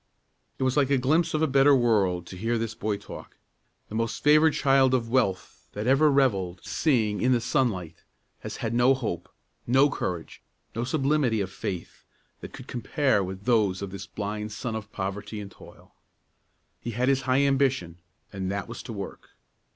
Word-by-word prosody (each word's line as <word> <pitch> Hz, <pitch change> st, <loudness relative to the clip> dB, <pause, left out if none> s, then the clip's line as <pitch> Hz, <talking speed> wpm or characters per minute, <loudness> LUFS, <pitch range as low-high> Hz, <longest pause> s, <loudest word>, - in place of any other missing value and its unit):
It -, -, -2 dB
was 130 Hz, 0 st, +1 dB
like 140 Hz, -2 st, +3 dB
a 140 Hz, -, +3 dB
glimpse 155 Hz, +6 st, +1 dB
of 155 Hz, -, +1 dB
a -, -, +3 dB
better 140 Hz, +1 st, +5 dB
world 100 Hz, -8 st, +2 dB
to 95 Hz, -, -10 dB
hear 115 Hz, +6 st, -1 dB
this 115 Hz, 0 st, -3 dB
boy 105 Hz, -2 st, -2 dB
talk. 100 Hz, -, -11 dB, 0.5 s
The -, -, -12 dB
most 115 Hz, 0 st, -2 dB
favored 155 Hz, +2 st, +5 dB
child 135 Hz, -2 st, +4 dB
of 115 Hz, -2 st, -2 dB
wealth 95 Hz, -, -1 dB
that 105 Hz, +1 st, -4 dB
ever 135 Hz, +4 st, +4 dB
revelled 100 Hz, -10 st, +1 dB
seeing 110 Hz, -9 st, +1 dB
in 130 Hz, +1 st, +3 dB
the 120 Hz, -, +3 dB
sunlight 110 Hz, -, -1 dB, 0.4 s
has -, -, -7 dB
had 110 Hz, -, -1 dB
no 120 Hz, +3 st, +4 dB
hope, 105 Hz, -10 st, -4 dB, 0.4 s
no 135 Hz, +4 st, +4 dB
courage, 85 Hz, -8 st, -4 dB, 0.3 s
no 115 Hz, -, -1 dB
sublimity 135 Hz, -3 st, +1 dB
of 95 Hz, -2 st, -3 dB
faith, 90 Hz, -3 st, -6 dB, 0.4 s
that -, -, -9 dB
could -, -, -10 dB
compare 125 Hz, -2 st, 0 dB
with 95 Hz, +1 st, -7 dB
those 105 Hz, -6 st, +2 dB
of 100 Hz, -, -5 dB
this 95 Hz, -1 st, -7 dB
blind 105 Hz, +1 st, -4 dB
son 110 Hz, +2 st, -4 dB
of 110 Hz, -1 st, -7 dB
poverty 100 Hz, +2 st, -5 dB
and 100 Hz, -1 st, -8 dB
toil. -, -, -16 dB, 0.9 s
He 120 Hz, -, -6 dB
had 125 Hz, +1 st, +1 dB
his 135 Hz, -1 st, +3 dB
high 130 Hz, +2 st, +4 dB
ambition, 135 Hz, -11 st, +1 dB, 0.3 s
and 95 Hz, -1 st, -3 dB
that 100 Hz, 0 st, -3 dB
was -, -, -7 dB
to 115 Hz, -, -8 dB
work. 100 Hz, -2 st, -8 dB
115 Hz, 180 wpm, -26 LUFS, 100-135 Hz, 0.9 s, better